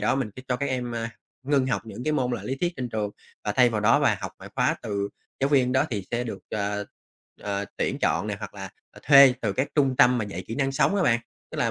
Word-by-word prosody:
đó - - +2
mình 130 -6 -2
sẽ 130 - -8
cho 125 - +1
các 140 - -2
em, 125 -2 -2
a, 115 0 -3 0.4
ngưng 140 -2 +2
học 105 -6 -1
những 115 +2 -8
cái 155 - +1
môn 125 -4 0
là 110 -5 -3
lý 130 +6 -2
thuyết 175 +4 -1
trên 125 -2 -3
trường 105 -3 -2 0.3
và 105 - 0
thay 125 0 +5
vào 110 -2 -1
đó 105 - +4
và - - +3
học - - -5
ngoại - - -11
khóa - - +2
từ 100 -1 -2 0.3
giáo 135 - +2
viên 130 -3 +3
đó 130 - +3
thì 100 -4 -3
sẽ 120 +1 -1
được, 115 - -5
ờ, 105 0 -2 0.6
ờ, 100 0 -2
tuyển - - -1
chọn - - +1
nè - - -3
hoặc - - -8
là, - - -7 0.2
à, - - -14
thuê 140 -3 +8
từ 105 -4 0
các 130 +6 -1
trung 135 -4 +2
tâm 125 0 +5
mà 110 - -1
dạy 95 -2 -6
kỹ 115 - -5
năng 135 0 0
sống 195 +8 +2
á 190 - +2
bạn. 115 -6 +3 0.3
Tức - - -7
là - - +2
125 Hz, 275 wpm, -26 LUFS, 105-135 Hz, 0.6 s, thuê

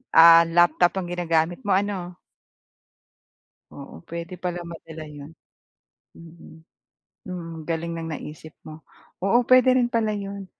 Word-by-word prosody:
ah, 165 0 +8
laptop 175 +2 +3
ang 175 -2 -4
ginagamit 170 0 0
mo 195 - +3
ano? 190 -3 -2 1.6
Oo, 140 +3 -12
puwede 170 +1 -7
pala 175 -1 -5
madala 160 -1 -10
'yan. 145 0 -11 0.9
Mm. 165 -1 -15 0.6
Mm, 165 -3 -7
galing 165 +1 -3
ng 165 0 -5
naisip 155 +1 -9 0.2
mo. 155 0 -11 0.4
Oo, 235 +5 +2
puwede 255 0 +6
rin 240 - +2
pala 230 -3 0
'yon 200 -1 -6
170 Hz, 125 wpm, -23 LUFS, 165-190 Hz, 1.6 s, ah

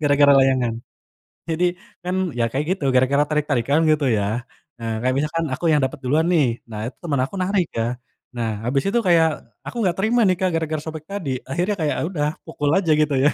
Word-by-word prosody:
gara-gara 145 -1 +5
layangan, 130 -3 +2 0.8
jadi 165 +2 +2 0.4
kan 180 +1 -1 0.2
ya 120 - +2
kayak 140 +5 -1
gitu 150 - -6
gara-gara 130 +3 +4
tarik-tarikan 145 -1 +1
gitu 150 -2 +2
ya, 110 +4 -2 0.3
eee, 115 -1 -2
kayak 130 +1 +1
misalkan 155 +3 -1
aku 170 - -7
yang 150 - +4
dapet 130 +1 -1
duluan 150 +6 +2
nih 160 -6 +4 0.2
nah 105 0 -4
itu 125 - -6
teman 150 -6 -1
aku 145 - -8
narik 185 -1 +1
Kak, 115 +1 0 0.5
nah 115 -2 -1
habis 135 +3 0
itu 235 +4 +2
kayak 165 -2 +5 0.4
aku - - -7
nggak 180 -3 +1
terima 230 +4 +2
nih 185 - +2
Kak 185 -1 +2
gara-gara 155 -1 -2
sobek 160 -1 -6
tadi 200 -8 -3 0.2
akhirnya 180 +9 0
kayak 155 -2 0
udah 150 -5 -1 0.2
pukul 145 -1 -1
aja 170 -5 +1
gitu 150 -1 +2
ya 150 - +6
150 Hz, 200 wpm, -22 LUFS, 130-170 Hz, 0.8 s, ya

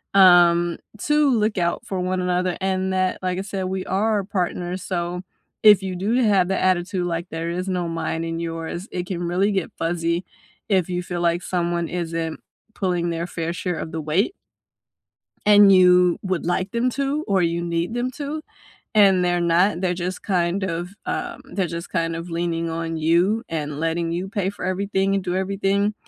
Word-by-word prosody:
um 175 -2 +6 0.3
to 295 0 +3 0.3
look 210 -2 0
out 170 0 -1
for 190 -2 -3
one 185 +1 -1
another 180 0 0
and 190 0 0
that, 185 0 +1
like 185 0 -1
I - - -1
said, 190 -2 -2
we 185 0 -3
are 205 +1 +1
partners 180 -1 -2
so 175 -1 -3 0.4
if 210 -2 +7
you 185 -1 -3
do 195 +5 -1 0.2
have 185 -2 +3
the 190 - 0
attitude, 180 0 0
like 170 +2 -5
there 165 +1 -4
is 185 - -4
no - - -1 0.2
mine 165 0 -2
and 165 0 -3
yours, 165 +1 -4 0.2
it 180 - -2
can 175 -2 -3
really 195 +3 +2
get 190 -3 -1
fuzzy 170 0 0 0.6
if 180 - +2
you 175 - 0
feel 175 -1 -2
like 175 +1 -3
someone 170 -2 -1 0.2
isn't 165 -1 -3 0.4
pulling 180 -3 0
their 170 +1 -3
fair 165 0 -2
share 180 -3 -2
of - - -7
the 160 -1 -3
weight 195 - +2 1.2
and 205 -1 +8
you 180 -1 +6
would 185 -2 -1
like 185 +2 -1
them 235 +2 +1
to 280 +4 -1
or 195 -2 +2
you 170 0 0
need 170 +4 -2
them 245 +1 -1
to, 295 +4 -5 0.5
and 195 -3 +5
they're 175 0 +1
not, 170 +2 +2
they're 180 -1 0
just, 180 +1 -4
kind 180 0 0
of, 175 0 -3 0.2
um, 365 -4 -3
there 190 -3 0
just 170 0 -6
kind 165 0 -1
of 165 +2 -6
leaning 165 0 -1
on 165 0 -3
you 175 +8 +2
and 150 -2 -4
letting 165 +1 -1
you 180 +3 -3
pay 195 -2 -1
for 200 - -8
everything 195 +1 0
and 195 -2 -1
do 180 -1 -2
everything, 200 +2 0
180 Hz, 190 wpm, -22 LUFS, 170-195 Hz, 1.2 s, and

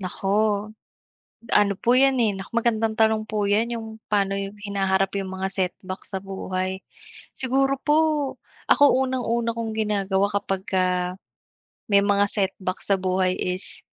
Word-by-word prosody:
Naku, 190 +1 -4 1.3
ano 200 -1 +5
po 240 +1 +3
yan, 270 0 +5
eh, 225 -3 +3
nak 190 0 -8
magandang 225 -2 0
tanong 220 -1 +3
po 210 -2 0
yan 220 +4 +2
yung 225 -1 -7 0.2
pano 195 -1 +2
yung 200 +1 -5
hinaharap 195 -1 0
yung 195 -1 -3
mga 190 0 -2
setback 185 0 -4
sa 190 - -5
buhay. 190 0 -4 0.5
Siguro 270 +1 +1
po 295 +2 +2 0.7
ako 285 -1 +6
unang-una 235 -2 -1
kong 230 -1 -3
ginagawa 200 -2 +1
kapagka 185 -2 -1 0.7
may 200 -1 +5
mga 200 0 +3
setback 190 -2 -2
sa 200 - +2
buhay 185 0 +1
is 180 +1 -4
200 Hz, 140 wpm, -24 LUFS, 190-225 Hz, 1.3 s, ako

